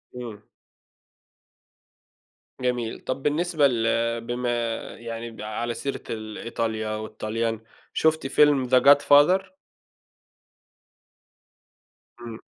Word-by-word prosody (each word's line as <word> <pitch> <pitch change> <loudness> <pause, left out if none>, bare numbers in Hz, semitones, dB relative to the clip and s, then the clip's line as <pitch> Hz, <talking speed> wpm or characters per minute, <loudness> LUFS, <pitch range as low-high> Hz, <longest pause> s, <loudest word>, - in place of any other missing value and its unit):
إمم. 115 -4 -7 2.2
جميل. 125 -2 -2
طَب 130 +1 -4
بالنسبة 155 0 +2
ل 115 -1 0
بما 120 +1 -3 0.5
يعني 115 0 -6
ب 110 - -11
على 110 +3 -3
سيرة 120 +4 -4
ال 110 -1 -6
إيطاليا 110 -2 -3
والطاليان، 110 +1 -3 0.3
شُفتِ 160 -3 +1
فيلم 140 -3 +3
The 130 0 +5
God 140 0 +7
father؟ 185 +7 +4 2.6
إمم. 115 -1 -8
120 Hz, 90 wpm, -25 LUFS, 115-140 Hz, 2.6 s, God